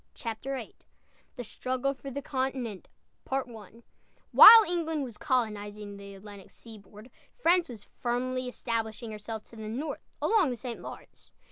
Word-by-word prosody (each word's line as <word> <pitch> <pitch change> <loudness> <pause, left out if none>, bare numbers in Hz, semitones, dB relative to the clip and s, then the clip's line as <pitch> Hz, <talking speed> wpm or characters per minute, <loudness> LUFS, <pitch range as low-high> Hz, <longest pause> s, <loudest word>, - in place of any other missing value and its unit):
CHAPTER 235 +4 -5
VIII 240 -4 -7 0.6
THE 245 - -6
STRUGGLE 255 +4 -2
FOR 275 0 -9
THE 280 +1 -6
CONTINENT 260 -7 -3 1.4
While 450 +1 +11
England 325 -3 -1
was 240 -5 -9
colonizing 210 -5 -2
the 200 0 -11
Atlantic 200 0 -12
seaboard, 215 +1 -14 0.2
France 355 - +2
was 225 -4 -10
firmly 255 +1 -1
establishing 230 -2 -4
herself 215 +1 -7
to - - -16
the 215 -1 -6
north 270 +8 -4 0.2
along 420 -9 +3
the 245 - -4
St. 235 0 -7
Lawrence. - - -12
240 Hz, 135 wpm, -29 LUFS, 215-270 Hz, 1.4 s, While